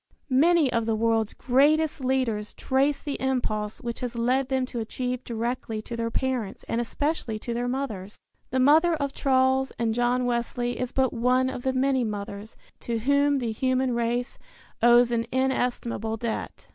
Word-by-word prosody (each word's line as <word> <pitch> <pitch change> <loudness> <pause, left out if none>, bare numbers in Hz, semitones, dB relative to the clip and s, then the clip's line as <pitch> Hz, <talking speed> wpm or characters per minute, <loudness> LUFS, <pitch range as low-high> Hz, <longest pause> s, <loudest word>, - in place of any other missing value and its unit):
Many 305 +1 +4
of 230 -1 0
the 225 - +1
world's 225 -1 +1
greatest 290 +3 +2
leaders 250 -5 -1
trace 275 +2 +1
the 285 -2 -5
impulse 220 -5 -1
which 235 -1 -4
has 245 -1 -4
led 250 +3 +1
them 260 -1 +1
to 245 -2 -5
achieve 250 +3 -3
directly 230 -1 -3
to 235 - -6
their 230 0 -2
parents 250 -4 -2
and 235 - 0
especially 250 -2 -2
to 235 +2 -5
their 240 +1 -2
mothers. 220 -7 -4 0.3
The 260 - 0
mother 315 +6 +5
of 280 -3 -3
Charles 265 0 +2
and 230 -1 0
John 245 +1 +1
Wesley 240 0 -1
is 250 -1 -2
but 260 -2 +1
one 255 +2 +2
of 250 - -6
the 260 +1 0
many 260 0 +2
mothers 205 0 -6 0.2
to 235 -1 -2
whom 280 +4 +2
the 240 -4 -1
human 255 +2 0
race 235 +2 -1 0.4
owes 240 +1 +6
an 230 0 0
inestimable 245 -4 -1
debt. 225 0 -5
245 Hz, 170 wpm, -26 LUFS, 230-265 Hz, 0.4 s, owes